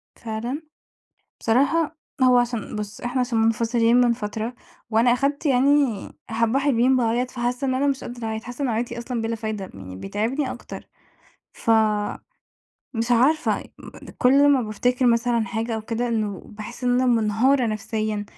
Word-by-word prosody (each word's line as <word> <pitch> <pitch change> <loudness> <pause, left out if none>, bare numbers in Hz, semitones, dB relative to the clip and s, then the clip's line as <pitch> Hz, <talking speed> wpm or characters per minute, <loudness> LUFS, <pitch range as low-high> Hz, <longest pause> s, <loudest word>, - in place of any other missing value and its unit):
فعلًا؟ 235 +6 -4 0.8
بصراحة 295 +7 +2 0.3
هو 250 -1 +6
عشان 235 -3 -2
بُص 210 -1 -6
إحنا 250 +1 -1
عشان 240 -2 0
منفصلين 230 +1 +2
من 245 -1 +5
فترة 225 +1 -4 0.4
وأنا 230 +2 +4
أخدت 280 +4 0
يعني 270 -4 +3 0.2
حبّة 230 +3 +1
حلوين 265 -2 +3
باعيّط 245 +1 +1
فحاسّة 245 +2 -2
إن 260 - 0
أنا 275 +2 +1
مش 275 -2 -1
قادرة 240 -1 -7
أعيّط، 220 0 -4
حاسّة 245 +3 -7
إن 265 - +1
عياطي 235 +1 -2
أصلًا 235 -1 -3
بلا 225 0 -2
فايدة 215 -3 -5
يعني 95 -1 -9
بيتعبني 225 - -2
أكتر، - - -9 0.7
ف 230 - -1 1.2
مش 230 +1 -2
عارفة 275 +7 +3
أ - - -11 0.3
أ - - -11
كلّ 280 +3 +5
ما 270 -3 +4
بافتكر 245 +4 0
مثلًا 235 -1 +2
حاجة 225 0 -2
أو 220 - -4
كده 235 +2 -2
إنه 215 -4 -2
باحس 220 +4 -9
إن 245 - +2
أنا 255 +1 +2
منهارة 235 +3 +3
نفسيًا 215 0 -2
240 Hz, 160 wpm, -23 LUFS, 220-255 Hz, 1.2 s, هو